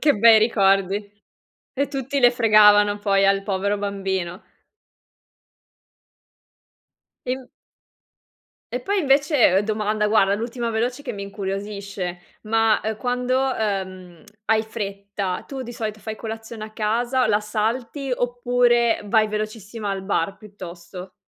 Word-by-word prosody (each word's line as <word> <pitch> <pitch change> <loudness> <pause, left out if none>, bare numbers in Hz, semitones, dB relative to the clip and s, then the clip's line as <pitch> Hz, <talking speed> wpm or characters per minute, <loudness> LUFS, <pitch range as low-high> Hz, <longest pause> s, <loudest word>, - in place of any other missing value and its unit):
Che 295 -1 +4
bei 225 +1 +7
ricordi. 200 -2 +2 0.7
E 280 - +1
tutti 275 0 -2
le 245 -1 +7
fregavano 210 -3 +5
poi 195 -1 +2
al 195 0 +2
povero 200 0 -1
bambino. 190 -3 -3 2.8
E 250 - 0
m 260 -2 -13 1.2
e 250 - -2
poi 400 +9 -1
invece 280 - +3
uhm, - - +3
domanda, 210 0 0
guarda, 200 -2 +3
l'ultima 235 +2 -3
veloce 245 +5 -2
che 250 -4 -5
mi 200 -1 -6
incuriosisce 200 -2 -5 0.2
ma, 225 0 +2
ehm, 220 0 -3
quando, 250 +1 0
uhm, 190 -7 -3 0.2
hai 220 0 +3
fretta 200 -3 -5
tu 270 -2 -6
di 240 0 -8
solito 215 -2 -5
fai 215 +1 -6
colazione 225 0 -7
a 215 - -11
casa, 240 +4 0
la 210 -1 +2
salti 230 +6 -2
oppure 245 -1 +2
vai 215 +1 +2
velocissima 215 0 -4
al 195 -1 -3
bar, 195 -1 -1
piuttosto? 185 -3 -10
215 Hz, 125 wpm, -22 LUFS, 200-240 Hz, 2.8 s, bei